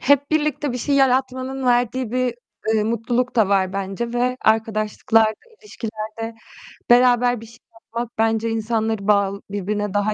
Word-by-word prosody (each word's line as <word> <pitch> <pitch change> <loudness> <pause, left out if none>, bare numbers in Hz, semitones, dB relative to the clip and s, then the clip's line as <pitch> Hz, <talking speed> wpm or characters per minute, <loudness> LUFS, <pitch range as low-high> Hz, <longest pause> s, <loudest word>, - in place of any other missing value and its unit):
hep 285 +1 +3
birlikte 300 -3 0
bir 250 - -3
şey 280 +4 0
yaratmanın 260 0 +1
verdiği 245 0 +1
bir, 250 0 0 0.4
eee, 215 - +2
mutluluk 235 +3 -1
da 220 -4 +4
var 190 -2 +2
bence 195 +4 -3
ve 250 +1 0
arkadaşlıklarda, 220 +1 +2 0.3
ilişkilerde 225 - -6 0.6
beraber 245 -1 +4
bir - - -10
şey 230 +2 -16 0.2
yapmak 230 +1 -7
bence 225 0 +1
insanları 220 -2 -1
bağl 200 -1 +2
birbirine 205 0 -2
daha 205 +1 +1
230 Hz, 140 wpm, -21 LUFS, 215-250 Hz, 0.6 s, da